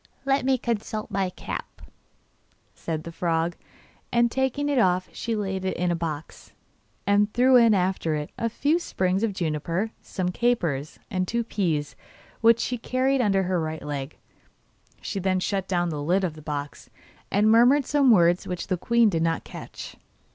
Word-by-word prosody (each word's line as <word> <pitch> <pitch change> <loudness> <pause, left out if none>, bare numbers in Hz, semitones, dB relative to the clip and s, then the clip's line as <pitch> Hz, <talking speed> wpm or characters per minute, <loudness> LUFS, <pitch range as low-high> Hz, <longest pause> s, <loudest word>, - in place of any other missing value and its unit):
'Let 270 -1 +1
me 265 0 +3
consult 220 -2 -3
my 195 -2 0
cap,' 180 - -7 0.9
said 160 -2 -4
the 170 - -7
frog; 165 0 -1 0.6
and 235 0 +3
taking 265 +3 0
it 285 -3 +2
off 185 -3 +2
she 230 -1 -3
laid 190 -3 -2
it 190 - -2
in 180 0 0
a - - +1
box, 160 -2 -6 0.5
and 205 +1 +3
threw 255 +2 +5
in 230 -3 +6
after 180 -4 0
it 150 0 -4
a 230 - -1
few 290 +8 +1
sprigs 185 - -1
of 225 -2 +1
juniper, 170 +4 -2
some 185 -2 -3
capers, 175 - -1
and 185 -1 -1
two 235 +3 0
peas, 165 -10 -2 0.4
which 230 0 +5
she 245 0 -2
carried 260 +3 +1
under 195 -4 +2
her 180 -1 0
right 160 0 -4
leg; 145 -1 -5 0.8
she 200 - -4
then 185 0 +1
shut 195 0 -2
down 175 -2 0
the 150 -3 -4
lid 180 +6 +1
of 175 -4 -1
the 155 - -12
box, 145 -1 -6 0.4
and 210 +2 +3
murmured 245 +5 +5
some 280 -2 +3
words 175 -5 +4
which 180 -1 -4
the 185 - -1
queen 235 +5 +3
did 165 -6 0
not 165 0 0
catch. - - -9
190 Hz, 175 wpm, -25 LUFS, 170-235 Hz, 0.9 s, in